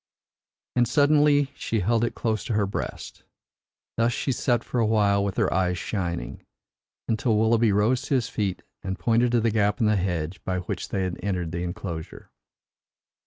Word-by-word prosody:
And 120 -1 +3
suddenly 145 0 +4
she 110 -2 -2
held 115 +4 +2
it 120 - -1
close 110 -3 -1
to 120 - -2
her 105 -1 +2
breast. 95 - -6 0.7
Thus 115 +1 +3
she 135 - -1
sat 120 -1 +1
for 125 - -2
a 115 - +3
while 100 -2 +3
with 100 -2 -3
her - - +2
eyes 90 0 +1
shining, 90 -3 -4 0.7
until 110 0 +1
Willoughby 110 0 +3
rose 105 +6 +2
to 140 - +1
his 125 -3 +1
feet 100 -6 -2 0.2
and 95 -1 -4
pointed 120 +3 +2
to 120 - +4
the 115 0 +2
gap 105 -1 +1
in 115 - +2
the 105 -1 +3
hedge 90 -2 -2
by 90 0 -1
which - - -5
they 95 - -1
had 90 -1 -3
entered 90 -4 -2
the 85 0 -3
enclosure. 90 -3 -6
105 Hz, 180 wpm, -25 LUFS, 95-120 Hz, 0.7 s, suddenly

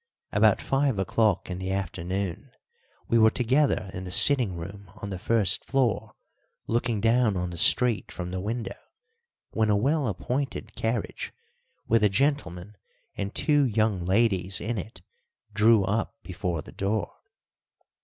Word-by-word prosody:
About - - +4
five 135 -4 +1
o'clock 100 +1 +1
in 90 - -4
the 95 0 -4
afternoon 95 - -3 0.6
we 115 - +3
were 110 0 +7
together 125 -4 +1
in 90 - -6
the 90 - -7
sitting 120 0 +4
room 95 +3 -9
on 100 -1 -7
the 95 - -5
first 100 -3 +1
floor, 115 -5 0 0.5
looking 120 -1 0
down 115 -1 +2
on 90 0 -3
the 85 - -7
street 120 +3 +3
from 90 0 -6
the 90 0 -3
window, 115 +3 -4 0.7
when 110 -1 +1
a 105 - +4
well 140 +6 +1
appointed 125 +7 -3
carriage 115 -1 -3 0.6
with 115 0 +3
a 105 - +4
gentleman 105 - -1 0.4
and 100 0 -4
two 145 -2 +3
young 110 -6 +1
ladies 95 -1 +1
in 115 0 -3
it 90 -2 -10 0.5
drew 105 0 +5
up 105 +7 -1
before 90 -4 -4
the - - -12
door. 100 +2 -2
105 Hz, 145 wpm, -26 LUFS, 95-115 Hz, 0.7 s, were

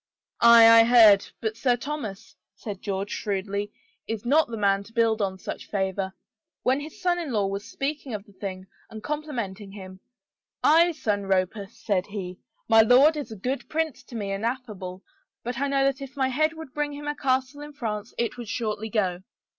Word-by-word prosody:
"Aye, 235 -1 +8
I - - +8
heard. 225 -4 +7
But 220 -1 -2
Sir 245 +1 +1
Thomas," 235 -6 -6 0.2
said 205 -3 -7
George 200 0 -3
shrewdly, 200 0 -3 0.2
" 460 - -38
is 225 0 -4
not 300 +6 +4
the 230 -1 -6
man 200 -1 +2
to 225 - -16
build 225 -2 +2
on 190 -1 -1
such - - -7
favor. 190 -1 -1 0.5
When 260 +2 +2
his 300 +2 -9
son 355 -1 +1
in 320 -6 -4
law 210 -4 +1
was 195 +1 -4
speaking 275 -3 -3
of 205 -1 -7
the 205 - -20
thing 190 -1 -6 0.2
and 220 -1 -9
compli 300 +1 -3
menting 200 -3 -5
him, 185 -2 -10 0.3
' - - -56
Aye, 335 +3 +5
son 205 -9 -2
Roper,' 195 +2 0
said 195 -4 -2
he, 190 -3 -6
* - - -45
my 225 0 +7
lord 260 +8 +6
is 285 -6 -5
a - - -6
good 255 +7 -4
prince 315 -4 -2
to 240 - -11
me 200 -3 -3
and 195 +2 -3
affable, 210 -7 -4 0.4
but 245 +1 -4
I 280 - +1
know 275 -1 +2
that 275 0 0
if 275 +1 -9
my 265 -1 +1
head 310 +5 +1
would 320 -4 -10
bring 295 -1 -2
him 290 +1 -8
a 295 - 0
castle 265 +1 -1
in 295 0 -9
France, 220 -5 -4
it 235 +1 -1
would 235 -3 -7
shortly 220 -2 -3
go.' 185 -5 0
225 Hz, 210 wpm, -26 LUFS, 200-275 Hz, 0.5 s, Aye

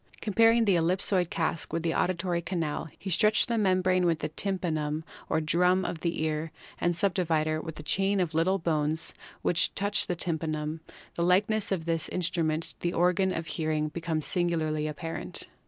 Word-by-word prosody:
Comparing 225 +2 +4
the 200 - +4
ellipsoid 180 +1 +1
cask 165 -2 -2
with 165 +1 -2
the 165 -1 +1
auditory 175 -1 0
canal, 165 -3 -2 0.2
the 195 - -3
stretched 215 +7 +3
membrane 185 -4 +2
with 165 -2 +2
the - - -3
tympanum 155 -4 -2 0.3
or 160 - +2
drum 180 +4 +2
of 165 - -3
the 170 -2 -1
ear 155 0 -2 0.3
and 175 0 +1
the - - -4
subdivider 160 -4 +1
with 160 -2 -6
the 150 - -9
chain 195 +5 +1
of 175 -3 0
little 175 +5 +2
bones 160 -2 0 0.3
which 175 - +2
touch 200 +1 +1
the 180 - -1
tympanum, 160 -2 -2 0.3
the - - -3
likeness 200 +5 +2
of 175 -4 -1
this 165 -2 0
in 180 - -2
strument 165 -2 0
to - - -39
the 175 0 -1
organ 180 +2 +2
of 165 - -3
hearing 155 -2 -1
becomes 160 -1 -3
singularly 160 -4 0
apparent. 165 +2 -4
170 Hz, 175 wpm, -28 LUFS, 160-185 Hz, 0.3 s, Comparing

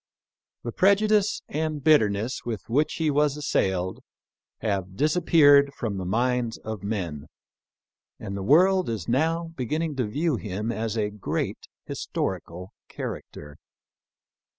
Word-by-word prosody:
The 120 - -4
prejudice 200 - +3
and 155 -1 -3
bitterness. 110 -6 +3
with 115 -4 -4
which 145 +7 +1
he 160 -2 +1
was 145 0 +2
assailed 95 -10 0 0.6
have 95 -4 -2
disappeared 145 -2 +5
from 110 -5 -3
the 95 - -4
minds 120 +3 0
of 110 -2 -6
men, 90 -8 -4 0.9
and 100 - -6
the 100 - -4
world 180 - +4
is 115 -2 -4
now 165 +7 +1
beginning 150 +4 -2
to 125 -4 0
view 150 +5 0
him 105 +2 -3
as 115 0 -3
a 105 -1 0
great 105 -2 -3 0.2
his - - -6
torical 90 +2 -3 0.2
character. 75 -1 -7
120 Hz, 130 wpm, -25 LUFS, 105-155 Hz, 0.9 s, disappeared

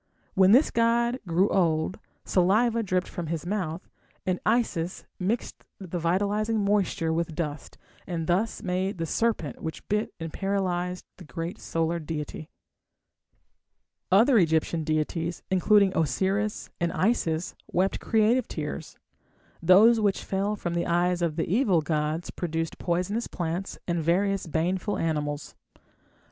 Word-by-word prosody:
When 190 0 +5
this 260 +7 +5
god 235 +2 +2
grew 175 +4 +3
old 165 -1 +1 0.3
saliva 220 +6 +3
dripped 185 -3 0
from 170 -2 -5
his 165 +1 -3
mouth, 180 -3 -3 0.4
and 185 -1 0
Isis 205 -7 0
mixed 205 +6 -2
the 180 -2 -5
vitalizing 205 +5 +1
moisture 195 -5 +1
with 165 -1 -2
dust, 150 -3 -4 0.3
and 170 -3 -3
thus 190 +7 0
made 190 +1 -1
the 165 - -2
serpent 190 - -1
which 160 - -6
bit 210 +1 0
and 165 -1 -6
paralysed 180 -2 -1
the 185 - -11
great 165 +3 -5
solar 165 +1 -1
deity. 155 0 -5 1.6
Other 225 +5 +6
Egyptian 160 -1 +1
deities, 160 +2 -2
including 195 +1 +4
Osiris 190 +6 0
and 170 -1 0
Isis, 175 -6 0 0.2
wept 185 +2 +1
creative 225 +3 +2
tears. - - -5 0.6
Those 205 +7 +6
which 205 -2 +1
fell 200 +2 -1
from 175 -4 -4
the 170 0 -1
eyes 175 +1 +1
of 165 -3 0
the 165 - 0
evil 195 -4 +3
gods 155 +1 -1
produced 165 -2 -3
poisonous 185 +6 -1
plants 175 +2 -4
and 170 -1 0
various 195 +3 +1
baneful 180 +6 -1
animals. 150 -2 -2
180 Hz, 130 wpm, -27 LUFS, 165-205 Hz, 1.6 s, Other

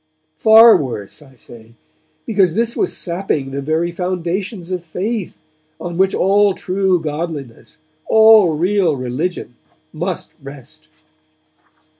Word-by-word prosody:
Far 225 +1 +7
worse, 120 -4 -6
I 135 -3 -18
say, 115 -1 -15 0.5
because 195 -6 +1
this 230 +1 -1
was 385 - -1
sapping 170 -6 -3
the 140 +1 -4
very 160 +4 -1
foundations 180 +1 -4
of 180 -2 -3
faith, 190 +5 -4 0.4
on 170 +1 -6
which 190 +2 +1
all 200 +1 +2
true 185 -1 0
godliness, 150 -5 -6 0.3
all 220 -6 +5
real 180 -1 +1
religion, 130 +2 -4 0.4
must 175 +3 -4
rest. 135 - -12
175 Hz, 115 wpm, -17 LUFS, 145-195 Hz, 0.5 s, Far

